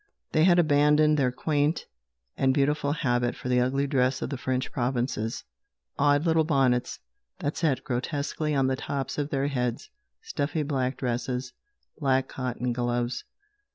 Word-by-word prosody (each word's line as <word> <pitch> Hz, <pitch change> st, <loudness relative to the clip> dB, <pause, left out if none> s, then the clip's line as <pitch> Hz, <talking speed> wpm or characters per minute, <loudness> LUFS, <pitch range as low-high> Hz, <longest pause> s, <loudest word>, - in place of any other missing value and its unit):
They 155 Hz, +1 st, +4 dB
had 175 Hz, -1 st, +5 dB
abandoned 150 Hz, -1 st, +4 dB
their 130 Hz, -2 st, +2 dB
quaint 150 Hz, +4 st, 0 dB, 0.5 s
and 130 Hz, -1 st, +2 dB
beautiful 145 Hz, 0 st, +1 dB
habit 120 Hz, -5 st, 0 dB
for 125 Hz, -, -6 dB
the 125 Hz, 0 st, +3 dB
ugly 135 Hz, +3 st, +1 dB
dress 130 Hz, -1 st, +1 dB
of -, -, -4 dB
the 140 Hz, -, -2 dB
French 130 Hz, 0 st, -2 dB
provinces 120 Hz, -3 st, -2 dB, 0.5 s
odd 145 Hz, +2 st, +3 dB
little 160 Hz, -1 st, +3 dB
bonnets 135 Hz, -5 st, +1 dB, 0.4 s
that 145 Hz, -, -2 dB
sat 140 Hz, -6 st, 0 dB
grotesquely 145 Hz, +3 st, -2 dB
on 135 Hz, -1 st, +3 dB
the 130 Hz, 0 st, +1 dB
tops 135 Hz, +2 st, -4 dB
of 145 Hz, 0 st, -1 dB
their 135 Hz, -1 st, 0 dB
heads, 125 Hz, -4 st, -2 dB, 0.3 s
stuffy 160 Hz, -, -2 dB
black 130 Hz, -3 st, -1 dB
dresses, 125 Hz, 0 st, -2 dB, 0.5 s
black 135 Hz, -3 st, +2 dB
cotton 125 Hz, -1 st, -3 dB
gloves. 120 Hz, 0 st, -1 dB
135 Hz, 150 wpm, -27 LUFS, 125-145 Hz, 0.5 s, had